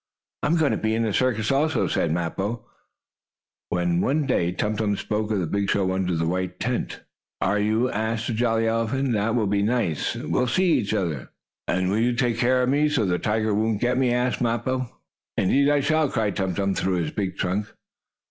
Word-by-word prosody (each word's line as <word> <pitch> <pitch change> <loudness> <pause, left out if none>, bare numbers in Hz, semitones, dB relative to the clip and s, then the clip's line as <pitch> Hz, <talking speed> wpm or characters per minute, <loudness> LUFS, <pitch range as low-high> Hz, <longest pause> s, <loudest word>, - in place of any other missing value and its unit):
"I - - 0
am 160 - +2
going 155 -3 +2
to - - -1
be 110 0 0
in 115 - 0
the 110 -3 -1
circus, 115 -3 +1
also," 155 +4 +2
said 80 - 0
Mappo, 95 +7 -2 1.0
when 90 0 +1
one 145 +3 +1
day 90 -10 +1
Tum 105 +4 -1
Tum 105 -2 0
spoke 105 0 -2
of 110 - 0
the 90 - 0
big 100 +4 -1
show 95 -2 +1
under 95 -2 0
the 80 0 0
white 90 +2 -2
tent. - - -2 0.4
"Are 105 - +1
you?" 110 +4 +2
asked 110 +2 -2
the 120 - -2
jolly 115 0 +1
elephant. 115 +3 0
"That 110 +2 0
will 115 -3 +1
be 100 0 +1
nice. 105 -8 0
We'll 125 - -1
see 185 +8 +2
each 105 -7 +1
other." 85 -10 -2 0.4
"And 95 +1 0
will 105 - +1
you 120 +1 +2
take 120 -2 0
care 125 +1 +3
of 125 - +1
me, 150 +2 +3
so 130 -7 +1
the 90 -2 0
tiger 110 +1 0
won't 110 0 0
get 125 +2 +1
me?" 130 -2 +2
asked 125 +1 0
Mappo. 120 +2 -1 0.5
"Indeed 140 +9 +3
I 145 -1 +3
shall!" 155 +1 +2
cried 110 -4 -1
Tum 95 -3 -1
Tum 100 +1 0
through 95 0 0
his 75 - -4
big 95 -2 -3
trunk. 100 +3 -2
110 Hz, 210 wpm, -24 LUFS, 95-125 Hz, 1.0 s, care